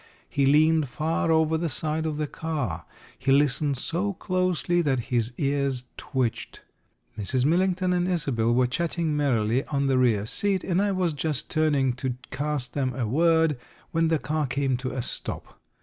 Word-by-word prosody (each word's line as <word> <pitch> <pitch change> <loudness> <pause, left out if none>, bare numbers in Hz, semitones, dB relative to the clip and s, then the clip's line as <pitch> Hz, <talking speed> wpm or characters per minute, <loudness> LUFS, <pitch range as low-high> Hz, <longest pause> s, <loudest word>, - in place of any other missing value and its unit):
He 140 -1 +1
leaned 155 0 +4
far 160 +4 0
over 160 0 +3
the 170 0 -1
side 155 +3 -2
of 155 -1 -3
the 150 - -1
car. 140 - -4 0.3
He 135 - +1
listened 140 0 +2
so 180 +9 -2
closely 185 -1 0
that 135 -6 +1
his 120 -1 +1
ears 140 -3 0
twitched. 125 -4 -3 0.6
Mrs. 125 +5 0
Millington 180 +3 +2
and 180 0 +1
Isobel 135 -10 0
were 125 +1 +3
chatting 165 +4 -1
merrily 125 -4 +1
on 140 -1 -1
the 135 -1 +2
rear 110 -5 +2
seat, 195 - 0
and 180 +1 +1
I 205 0 +1
was 185 -4 0
just 150 0 -3
turning 145 -5 +2
to 130 -1 -2 0.2
cast 145 -3 -3
them 130 -3 -1
a 125 -4 -1
word, 160 +2 +3 0.3
when 165 -1 +2
the 160 0 +2
car 150 0 -1
came 135 0 0
to 130 +1 -4
a 125 - -3
stop. - - -5
150 Hz, 170 wpm, -26 LUFS, 130-165 Hz, 0.6 s, leaned